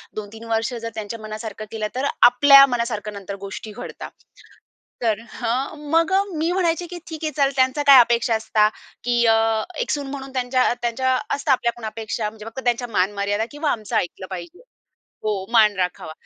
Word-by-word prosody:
2-3 215 +1 -8
वर्ष 225 +2 0
जर 230 -1 -5
त्यांच्या 220 +1 -5
मनासारखं 215 0 -7
केलं, 215 -1 -2
तर 260 - -1 0.2
आपल्या 275 +2 +8
मनासारखं 235 -4 -3
नंतर 200 0 -7
गोष्टी 200 +2 -7
घडतात. 220 - -8 0.9
तर 220 -3 +1
हं 265 +6 -3
मग 330 +3 +3 0.2
मी 325 +3 0
म्हणायचे 350 -2 0
की 355 - -7
"ठीक 320 -1 -7
आहे 310 - -1
चल, 275 -1 +3
त्यांचा 260 +2 +2
काय 275 -2 +10
अपेक्षा 235 -1 +2
असता 220 -1 +2 0.4
की 240 0 +2
अ, 225 0 +3 0.2
एक - - -1
सून 285 -2 -2
म्हणून 275 -1 -7
त्यांच्या 255 -1 +1
त्यांच्या 255 +2 +1 0.2
असता 285 0 -1
आपल्या 235 -2 +2
पण 225 - -8
अपेक्षा 220 -1 -3
म्हणजे 215 0 -13
फक्त 225 +4 -7
त्यांच्या 245 0 0
मान-मर्यादा 200 +3 0
किंवा 295 0 -1
आमचं 215 -4 -4
ऐकलं 185 +1 -3
पाहिजे." 195 - -8 0.6
हो, 205 -3 -2
मान 215 -3 +5
राखावा. 180 -3 -3
235 Hz, 175 wpm, -22 LUFS, 215-275 Hz, 0.9 s, काय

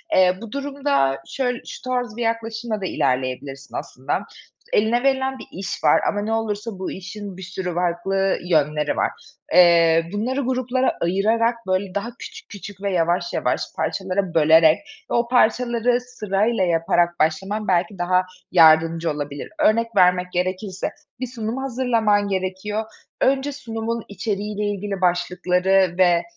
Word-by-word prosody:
Eee, 185 0 +4
bu 230 -2 -8
durumda 280 - 0
şöyl 250 -3 -2
şu - - -9
tarz 245 -3 -3
bir - - -4
yaklaşımla 225 -1 -2
da - - -2
ilerleyebilirsin 135 -2 -2
aslında. 130 +6 -3 0.5
Eline 230 +4 +2
verilen 265 -1 +1
bir - - -10
iş 190 +1 -5
var 150 - +5
ama 205 - -1
ne 220 +2 -2
olursa 215 -2 -3
bu 190 - -4
işin 195 +1 -8
bir - - -9
sürü 180 -1 -4
farklı 180 +2 0
yönleri 150 -3 +1
var. - - +1 0.4
Eee, 170 -2 +5
bunları 250 +7 -1
gruplara 255 0 0
ayırarak, 220 +6 +2
böyle, 185 0 -1
daha 200 +4 -2
küçük - - -10
küçük 205 -1 -10
ve 200 - -1
yavaş 175 0 0
yavaş - - 0
parçalara 190 -2 -2
bölerek 160 0 +6 0.3
ve - - 0
o 235 0 +2
parçaları 245 0 +2
sırayla 215 -3 -1
yaparak 175 0 +1
başlaman 190 +8 0
belki 180 +2 +1
daha 180 +1 +2 0.3
yardımcı 165 -1 +5
olabilir. 145 -1 -5
Örnek 230 +1 +2
vermek 180 -1 +4
gerekirse: 185 +2 -2 0.3
Bir 255 - -3
sunum 230 -1 -4
hazırlaman 230 -6 +1
gerekiyor. 195 +3 -2 0.4
önce 270 +2 +2
sunumun 230 -4 -4
içeriğiyle 205 +1 -3
ilgili 200 -1 -3
başlıkları 180 +1 +2
ve, 175 -2 +4
195 Hz, 140 wpm, -22 LUFS, 175-230 Hz, 0.5 s, bölerek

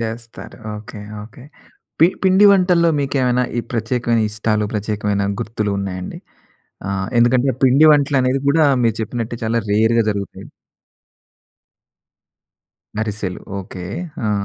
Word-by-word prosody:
చేస్తారు. 115 +1 -7 0.2
Okay. 105 0 -10 0.2
Okay. 125 +3 -15 0.6
P 165 - +8 0.2
పిండి 190 +2 +6
వంటల్లో 180 -3 +3
మీకేమైనా 125 -3 +1
ఈ - - +2
ప్రత్యేకమైన 115 0 0
ఇష్టాలు 110 0 -1
ప్రత్యేకమైన 105 -1 -1 0.2
గుర్తులు 110 -2 -2
ఉన్నాయండి? 95 -2 -5 0.7
ఆహ్, 95 -1 -2
ఎందుకంటే 125 +3 +3
పిండి 135 +5 +5
వంటలనేది 135 -2 +2
గూడా 155 +1 +4 0.2
మీరు 115 -1 +1
చెప్పినట్టే 115 +1 -4
చాలా 115 +1 0
రేర్‌గా 110 +2 +3
జరుగుతాయి. 100 -1 -6 2.5
అరిసెలు. 105 -4 -4 0.2
ఓకే. 95 -1 -10 0.5
ఆ! - - +1
115 Hz, 110 wpm, -19 LUFS, 105-130 Hz, 2.5 s, P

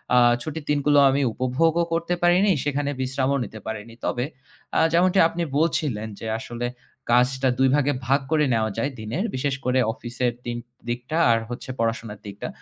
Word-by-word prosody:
আ - - +6 0.2
ছুটির 155 +2 -5
দিনগুলো 145 0 +3
আমি 135 +1 +1
উপভোগও 160 +8 +1
করতে 170 +1 0
পারিনি, 180 +4 +5
সেখানে 145 0 -1
বিশ্রামও 135 +1 0
নিতে 110 0 -8
পারিনি। 110 +1 -6
তবে 120 0 0 0.5
আ - - +5
যেমনটি 185 +3 +4
আপনি 170 +1 -3
বলছিলেন 145 -8 0
যে 115 - -6
আসলে 120 +1 -4 0.4
কাজটা 130 +2 +3
২ 135 0 +5
ভাগে 145 0 +2
ভাগ 135 +2 +4
করে 155 -1 +3
নেওয়া 110 -1 +1
যায় 140 - 0
দিনের। 115 - -2
বিশেষ 135 +1 0
করে 130 +1 +2
অফিসের 120 0 -2
দিন 120 0 -3 0.3
দিকটা 125 +6 -3
আর 115 - +4
হচ্ছে 120 +2 -7
পড়াশোনার 115 -2 -2
দিকটা। 100 0 -6
130 Hz, 165 wpm, -24 LUFS, 120-150 Hz, 0.5 s, আ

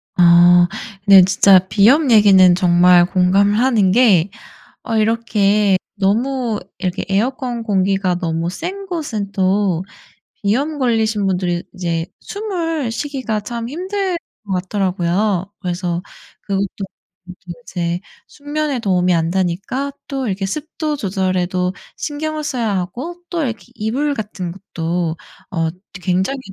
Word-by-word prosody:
아 175 0 +6 0.4
네. 195 -1 +9
진짜 190 0 +5
비염 240 +9 +4
얘기는 190 -4 +7
정말 175 0 +5
공감을 195 +3 +2
하는 230 -7 +3
게 200 -6 +4 0.6
어 225 -2 -2
이렇게 210 -3 +2 0.2
너무 225 +3 0 0.2
이렇게 185 0 -3
에어컨 240 +3 -1
공기가 195 -3 +1
너무 165 0 -2
센 385 - -6
곳은 255 - -4
또 190 -2 +1 0.6
비염 280 +9 0
걸리신 220 -5 +1
분들이 180 -2 -1
이제 170 -2 -2
숨을 335 - -3
쉬기가 255 -4 -3
참 235 +2 -5
힘들 375 +4 -2 0.3
것 195 - -2
같더라고요. 185 +1 -1
그래서 175 -1 -2 0.4
그것도 200 -1 -1 1.0
이제 175 -1 -2 0.3
숙면에 290 -1 -3
도움이 180 -4 +1
안 165 -1 +1
되니까 190 +10 -2 0.2
또 270 -2 -3
이렇게 195 0 -2
습도 305 +5 -3
조절에도 185 -4 -1 0.2
신경을 310 +1 -4
써야 235 -7 -1
하고 270 - -5
또 335 -3 -1
이렇게 230 -3 -4
이불 265 +7 -1
같은 205 -5 -5
것도 170 -3 -3 0.4
어 165 -3 0 0.2
드 185 - -10
굉장히 190 +9 0
200 Hz, 255 characters per minute, -18 LUFS, 180-255 Hz, 1.0 s, 네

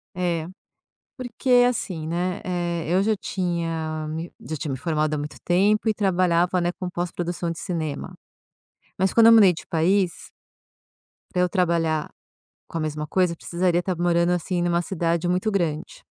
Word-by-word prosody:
É, 175 -3 -1 0.7
porque, 245 0 +2
assim, 185 -10 -2
né, 175 +2 -2
eh, 175 -3 -2
eu 185 +2 +3
já 215 +1 +1
tinha 165 -4 -3
me 160 +2 -5 0.2
já 155 - -3
tinha 145 - -4
me 135 - -2
formado 155 +1 0
há - - -2
muito 145 +1 -6
tempo 205 +5 +2
e 215 - +2
trabalhava, 180 -3 +2
né, 175 - +1
com 180 -1 -4
pós-produção 175 -1 -3
de 165 - -5
cinema. 160 -5 -4 0.8
Mas 190 +1 +1
quando 230 - +6
eu 230 - +9
mudei 200 -5 +7
de - - -10
país 175 +2 0 1.0
pra 180 - +1
eu 180 - +2
trabalhar 165 -5 +1 0.6
com 165 - -4
a - - -2
mesma 150 -1 -3
coisa 180 0 +1
precisaria 175 +1 0
tá 185 0 -1
morando, 170 0 +2
assim, 180 +1 -1
numa 175 0 +1
cidade 170 -1 -1
muito 185 +5 +1
grande 165 -6 -2
175 Hz, 165 wpm, -24 LUFS, 165-185 Hz, 1.0 s, eu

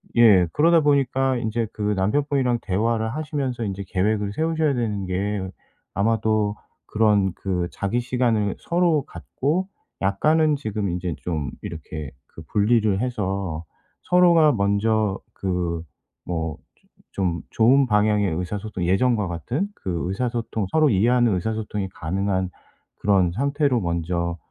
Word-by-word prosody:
예 105 -7 +6
그러다 165 +2 +5
보니까 135 -3 +2
이제 115 -1 -1
그 105 - -9
남편분이랑 125 +4 +1
대화를 110 +3 0
하시면서 140 -6 -3
인제 100 -2 -3
계획을 100 +1 0
세우셔야 160 -1 +1
되는 105 -6 -2
게 95 +1 -2 0.5
아마도 110 0 +1 0.3
그런 105 -4 +2
그 90 -3 -2
자기 100 +5 -1
시간을 120 -5 0
서로 170 -4 +1
갖고 165 +8 -2 0.3
약간은 150 +11 +2
지금 105 -7 -3
이제 90 0 -2
좀 80 -5 -3
이렇게 80 -3 -6 0.2
그 80 - -13
분리를 105 +3 +2
해서 95 -9 -2 0.4
서로가 170 -4 +5
먼저 100 0 +1
그 90 -3 -2 0.4
뭐 80 -3 -3 0.5
조 95 - -3
좀 85 -2 0
좋은 130 +5 +4
방향의 105 -3 +2
의사소통 95 +1 -4
예전과 105 +3 +2
같은 120 - -2
그 85 -3 -3
의사소통 115 -1 -2
서로 155 -2 +4
이해하는 115 +2 +3
의사소통이 105 0 -3
가능한 95 +2 -2 0.5
그런 95 -4 +3
상태로 140 - +1
먼저 85 0 -2
105 Hz, 280 characters per minute, -23 LUFS, 95-125 Hz, 0.5 s, 예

